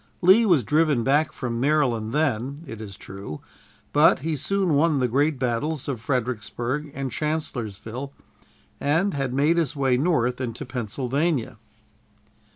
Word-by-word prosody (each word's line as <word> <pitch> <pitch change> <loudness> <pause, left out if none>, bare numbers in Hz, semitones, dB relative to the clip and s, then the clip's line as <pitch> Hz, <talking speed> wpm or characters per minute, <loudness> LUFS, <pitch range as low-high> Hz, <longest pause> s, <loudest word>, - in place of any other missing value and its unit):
Lee 200 +6 +6
was 165 -10 +4
driven 150 0 +2
back 145 +5 +2
from 120 -2 -4
Maryland 125 -6 +1
then, 140 0 -1
it 115 -6 -8
is 100 -3 -8
true, 95 -6 -8 0.5
but 150 -1 +5
he 160 -1 0
soon 185 +4 0
won 150 +1 +3
the 130 -2 +2
great 145 +5 +1
battles 130 +4 -1
of 130 -6 -3
Fredericksburg 125 +3 -2
and 135 -2 -3
Chancellorsville, 130 -5 -4 0.7
and 165 +8 +1
had 135 -2 -2
made 145 +6 +2
his 160 -5 0
way 135 -3 +2
north 130 -5 +1
into 125 +3 -4
Pennsylvania. 125 - -2
135 Hz, 140 wpm, -24 LUFS, 120-155 Hz, 0.7 s, Lee